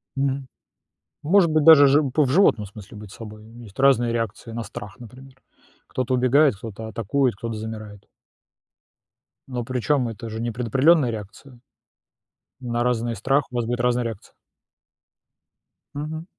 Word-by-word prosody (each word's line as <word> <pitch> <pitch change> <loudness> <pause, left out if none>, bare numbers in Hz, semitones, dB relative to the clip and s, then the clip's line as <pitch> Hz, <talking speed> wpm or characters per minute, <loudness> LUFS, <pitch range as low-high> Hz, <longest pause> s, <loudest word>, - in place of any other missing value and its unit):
Мгм. 135 -1 -2 0.8
Может 175 +2 +4
быть, 155 -1 +2
даже 155 -3 +9
жи 145 +3 +4
по 150 +3 +2
в 130 - -2
животном 135 - +3
смысле 105 0 -13
быть 105 -2 -11
собой, 105 -1 -11
есть 115 -2 -14
разные 125 -4 +3
реакции 115 0 -4
на 115 0 -4
страх, 100 +1 -9
например. 130 +3 -13 0.5
Кто-то 130 0 -2
убегает, 130 0 +3
кто-то 110 +1 -8
атакует, 115 +3 0
кто-то 115 +2 -5
замирает. 110 -2 -8 1.4
Но, 125 -3 -4
причём, 130 +1 0
это 115 0 -7
же 110 0 -6
не 120 0 -2
предопределённая 130 +5 +3
реакция. 110 +4 -10 1.0
На 120 -1 -2
разный 120 -1 -1
страх 135 +5 0
у - - -9
вас 120 - -1
будет 120 +1 -3
разная 125 0 +1
реакция. 115 -4 -7 1.6
Мгм. 155 +3 -6
120 Hz, 145 wpm, -23 LUFS, 110-135 Hz, 1.6 s, даже